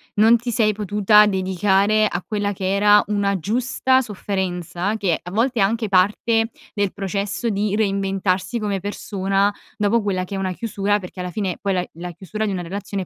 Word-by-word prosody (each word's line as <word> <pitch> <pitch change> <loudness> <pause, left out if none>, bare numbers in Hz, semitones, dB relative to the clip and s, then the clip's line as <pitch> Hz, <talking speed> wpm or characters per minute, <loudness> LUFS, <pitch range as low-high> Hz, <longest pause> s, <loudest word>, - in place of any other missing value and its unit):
non 220 +3 +6
ti 240 +1 -4
sei 215 -2 +2
potuta 210 +1 +4
dedicare 195 +2 +2
a 175 -2 -4
quella 205 -1 -1
che 190 0 -2
era 205 +1 +5
una 200 -1 0
giusta 255 +6 +1
sofferenza 190 -3 -3
che 185 -6 0
a 180 - -9
volte 235 +3 +1
è - - +5
anche 220 +2 0
parte 220 +4 +2 0.2
del 205 -2 -1
processo 200 +4 -2
di 205 0 0
reinventarsi 195 0 0
come 205 -2 -2
persona 195 0 -1 0.3
dopo 210 +3 +2
quella 185 -3 -1
che 185 - -8
è - - -2
una 190 -1 -2
chiusura, 205 0 -1
perché 185 0 -10
alla 180 0 -4
fine 195 -3 -2
poi 195 -1 0
la 180 - +1
i - - -8
la 175 +2 -7
chiusura 205 +5 -5
di 205 - -1
una 185 -2 -2
relazione 195 +2 -4
è - - -13
200 Hz, 195 wpm, -21 LUFS, 190-210 Hz, 0.3 s, non